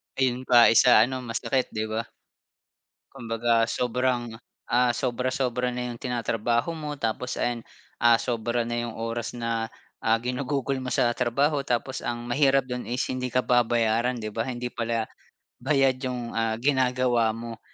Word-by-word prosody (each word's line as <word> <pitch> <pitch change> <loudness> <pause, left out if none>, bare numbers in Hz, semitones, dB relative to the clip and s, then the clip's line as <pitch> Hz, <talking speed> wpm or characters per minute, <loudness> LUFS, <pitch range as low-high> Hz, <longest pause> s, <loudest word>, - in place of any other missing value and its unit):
Yun 130 -1 0
pa 120 -2 +7
isa 115 -1 +7
ano 130 +2 -2
masakit, 125 +2 -1
di 110 - 0
ba? 110 +1 -3 1.1
Kumbaga 115 0 +1
sobrang, 125 -1 -1 0.3
ah, 125 +1 +3
sobra-sobra 125 0 -1
na 125 0 -3
yung 115 - -13
tinatrabaho 120 +4 -1
mo 150 -2 -6
tapos 115 +2 -2
ayan, 120 -1 -1 0.4
ah, 120 -1 +6
sobra 120 0 -1
na 120 0 -2
yung 115 -1 -5
oras 115 +1 -3
na, 115 -1 -3 0.3
ah, 110 0 +3
ginugugol 130 +3 -2
mo 125 - -4
sa - - +3
trabaho 140 +4 +1
tapos 125 +1 -2
ang 120 0 -4
mahirap 135 +1 +3
dun 125 -1 -4
is 125 +2 -3
hindi 125 -1 -3
ka 130 - +2
babayaran, 120 0 +2
'di 110 -1 -5
ba? 115 - 0
Hindi 125 -1 -4
pala 115 -2 -2 0.6
bayad 135 -3 +3
yung, 125 -2 -4
ah, 115 -1 0
ginagawa 125 -3 +2
mo. 115 -1 -7
120 Hz, 150 wpm, -26 LUFS, 115-125 Hz, 1.1 s, pa